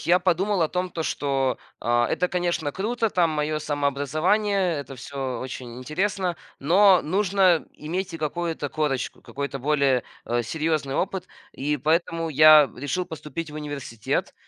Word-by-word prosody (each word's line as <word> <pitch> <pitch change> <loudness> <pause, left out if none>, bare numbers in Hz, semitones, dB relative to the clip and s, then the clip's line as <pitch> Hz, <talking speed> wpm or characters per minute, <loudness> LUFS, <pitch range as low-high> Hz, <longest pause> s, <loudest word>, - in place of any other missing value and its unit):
я 175 +2 +4
подумал 185 +1 +1
о 155 - +2
том, 180 +1 -2
то 165 - -3
что, 135 -4 0 0.2
а, 120 0 +2
это, 180 - +1
конечно, 175 -4 -1
круто, 225 - -1
там, 175 -5 +2
моё 155 0 -1
самообразование, 155 +8 +1
это 135 -1 -9
всё 130 -1 -4
очень 125 -1 -7
интересно, 180 +6 -1 0.2
но 185 +5 +5
нужно 185 -1 +2
иметь 180 +4 -4
и - - -5
какую-то 160 -1 -2
корочку, 145 -3 -2
какой-то 140 0 -5
более, 140 -3 +2 0.2
э, 120 0 0
серьёзный 155 +1 -1
опыт. 190 -1 -2 0.2
И 150 +2 -1
поэтому 165 +3 0
я 155 -1 +8
решил 145 +8 -2
поступить 160 +1 -6
в - - -11
университет. 145 -7 -3
155 Hz, 145 wpm, -25 LUFS, 140-180 Hz, 0.2 s, я